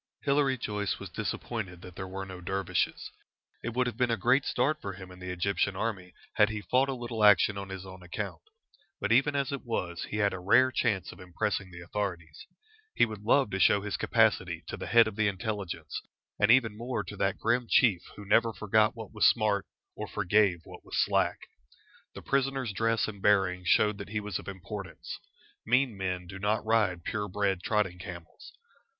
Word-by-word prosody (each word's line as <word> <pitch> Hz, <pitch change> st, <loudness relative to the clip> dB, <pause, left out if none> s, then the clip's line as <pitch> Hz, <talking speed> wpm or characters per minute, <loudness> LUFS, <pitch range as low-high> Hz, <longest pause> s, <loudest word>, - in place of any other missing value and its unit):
Hilary 140 Hz, -1 st, +2 dB
Joyce 105 Hz, -3 st, -2 dB
was -, -, -9 dB
disappointed 95 Hz, -7 st, -4 dB
that 90 Hz, -2 st, -11 dB
there 95 Hz, -, -5 dB
were 95 Hz, +1 st, -5 dB
no 95 Hz, -1 st, -9 dB
dervishes. 95 Hz, +1 st, -1 dB, 0.5 s
It 120 Hz, 0 st, -4 dB
would 125 Hz, 0 st, +2 dB
have 120 Hz, -3 st, -4 dB
been 125 Hz, -1 st, +2 dB
a 115 Hz, -, +1 dB
great 125 Hz, +6 st, +3 dB
start 145 Hz, +5 st, 0 dB
for 100 Hz, -, -5 dB
him 95 Hz, -1 st, -10 dB
in 90 Hz, -, -13 dB
the 90 Hz, 0 st, -6 dB
Egyptian 95 Hz, +2 st, 0 dB
army 95 Hz, -4 st, -3 dB, 0.2 s
had 105 Hz, -1 st, +6 dB
he 110 Hz, -1 st, -4 dB
fought 130 Hz, +4 st, +2 dB
a 135 Hz, -, -1 dB
little 120 Hz, -3 st, -3 dB
action 105 Hz, 0 st, +6 dB
on 100 Hz, -1 st, -6 dB
his 95 Hz, 0 st, -7 dB
own 95 Hz, -1 st, -11 dB
account. 90 Hz, 0 st, -5 dB, 0.6 s
But 105 Hz, -, -1 dB
even 135 Hz, +5 st, +4 dB
as 140 Hz, -1 st, 0 dB
it 140 Hz, -, -4 dB
was, 90 Hz, -8 st, -3 dB
he 105 Hz, -, -5 dB
had 100 Hz, -2 st, +2 dB
a 95 Hz, -, -5 dB
rare 120 Hz, +8 st, +4 dB
chance 105 Hz, -8 st, 0 dB
of -, -, -14 dB
impressing 95 Hz, +2 st, -2 dB
the 85 Hz, -1 st, -10 dB
authorities. 85 Hz, -4 st, -5 dB, 0.5 s
He -, -, +5 dB
would 110 Hz, -3 st, -8 dB
love 120 Hz, +2 st, +3 dB
to 95 Hz, -, -2 dB
show 100 Hz, -, +5 dB
his 105 Hz, 0 st, -3 dB
capacity -, -, +2 dB
to -, -, -3 dB
the -, -, -7 dB
head 115 Hz, -1 st, +6 dB
of 110 Hz, -, -5 dB
the 110 Hz, -1 st, +3 dB
Intelligence, 95 Hz, -5 st, -4 dB, 0.4 s
and 100 Hz, -, +4 dB
even 115 Hz, -3 st, +5 dB
more 120 Hz, +3 st, -3 dB
to 105 Hz, -, -8 dB
that 95 Hz, 0 st, 0 dB
grim 120 Hz, +2 st, +1 dB
Chief 105 Hz, -9 st, +4 dB
who 105 Hz, -, -10 dB
never 115 Hz, +3 st, +3 dB
forgot 110 Hz, +1 st, +2 dB
what 110 Hz, -3 st, -9 dB
was 105 Hz, -, +5 dB
smart, 105 Hz, -3 st, +2 dB, 0.3 s
or -, -, -5 dB
forgave 100 Hz, -3 st, +2 dB
what -, -, -12 dB
was -, -, -5 dB
slack. -, -, +2 dB, 0.8 s
The -, -, -9 dB
prisoner's 135 Hz, -4 st, 0 dB
dress 115 Hz, +2 st, +1 dB
and 100 Hz, -3 st, -8 dB
bearing 95 Hz, -3 st, +2 dB
showed 105 Hz, +3 st, +3 dB
that 100 Hz, -, -7 dB
he 105 Hz, 0 st, -1 dB
was 105 Hz, -3 st, -4 dB
of -, -, -12 dB
importance. 100 Hz, -1 st, -7 dB, 0.4 s
Mean 125 Hz, 0 st, +2 dB
men 90 Hz, -2 st, -3 dB
do 95 Hz, +2 st, -9 dB
not 105 Hz, +2 st, 0 dB
ride 105 Hz, -6 st, +2 dB
pure 105 Hz, +2 st, -2 dB
bred 95 Hz, -1 st, 0 dB
trotting 95 Hz, -3 st, 0 dB
camels. 90 Hz, -3 st, -10 dB
105 Hz, 200 wpm, -29 LUFS, 95-115 Hz, 0.8 s, had